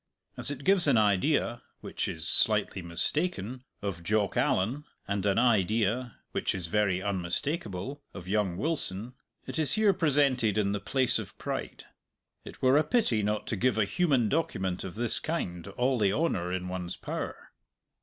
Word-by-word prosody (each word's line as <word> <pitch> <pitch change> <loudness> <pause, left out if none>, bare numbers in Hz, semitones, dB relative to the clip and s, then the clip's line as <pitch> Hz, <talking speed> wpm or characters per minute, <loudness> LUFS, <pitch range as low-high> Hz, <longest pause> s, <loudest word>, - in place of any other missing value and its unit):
As - - 0
it 140 -1 -5
gives 190 -2 +4
an 135 -5 +4
idea 115 +4 +2 0.2
which - - -3
is 80 0 -3
slightly 95 - +3
mistaken 125 - -1 0.2
of 95 -4 -3
Jock 100 +3 0
Allan, 120 +11 0 0.2
and 100 0 -1
an 100 - +2
idea 115 +1 +1
which - - -1
is 90 -3 -4
very 95 0 0
unmistakable 100 - -3
of 90 +1 -10
young 100 -3 0
Wilson, 125 - -1 0.3
it - - -4
is 155 - +6
here 215 -2 +4
presented 140 - +2
in 100 -2 +1
the 100 - -1
place 130 +5 +2
of - - -9
pride. - - -5 0.6
It - - -12
were 130 +2 +5
a - - +3
pity 150 - +1
not 105 +1 -1
to - - -2
give 120 +4 +1
a 105 - +3
human 135 - +2
document 95 - -1
of 95 -1 -7
this 120 0 +2
kind 90 - -4
all 125 +5 0
the 100 -2 +3
honour 100 - 0
in 90 0 -3
one's 90 -1 -4
power. - - -6
110 Hz, 165 wpm, -29 LUFS, 95-140 Hz, 0.6 s, is